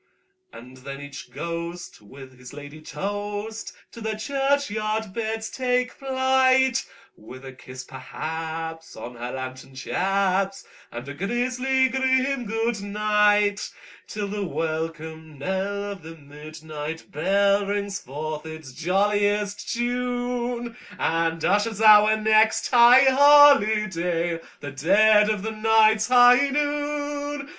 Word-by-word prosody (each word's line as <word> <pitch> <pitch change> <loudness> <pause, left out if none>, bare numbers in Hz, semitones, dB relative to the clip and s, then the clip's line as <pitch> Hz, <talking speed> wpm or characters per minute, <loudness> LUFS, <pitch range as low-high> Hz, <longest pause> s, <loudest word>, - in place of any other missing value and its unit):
And 125 +2 -13
then 140 +1 -9
each 140 -1 -10
ghost 170 -3 -7
with 130 +5 -14
his 125 +1 -12
ladye 145 +1 -11
toast 205 +5 -5 0.2
to 230 - -12
their 220 0 -3
churchyard 220 -4 -2
beds 220 0 -3
take 250 -1 -1
flight, 260 -1 +2 0.3
With 130 +5 -13
a 130 - -9
kiss, 130 0 -11
perhaps, 160 +5 -7
on 120 +1 -9
her 120 +1 -6
lantern 130 0 -8
chaps, 195 +5 -1 0.3
and 120 +3 -8
a 140 - -6
grisly 250 - 0
grim 260 0 0
"good 225 0 -2
night"; 210 0 +1 0.4
Till 210 -1 -5
the 205 0 -4
welcome 160 -2 -5
knell 195 +6 -3
of 195 -2 -9
the 160 +1 -11
midnight 155 +2 -9
bell 200 +1 +1
rings 200 0 -3
forth 150 +1 -6
its 160 -4 -10
jolliest 205 +5 -1
tune, 245 0 -3 0.2
And 165 0 -1
ushers 205 +2 0
our 215 0 +6
next 220 0 +2
high 245 +1 +7
holiday—the 210 - +3
dead 210 +9 +4
of 210 -3 -2
the 220 - -3
night's 220 0 +3
high 250 +2 +5
noon! 290 0 -3
205 Hz, 115 wpm, -24 LUFS, 160-240 Hz, 0.4 s, high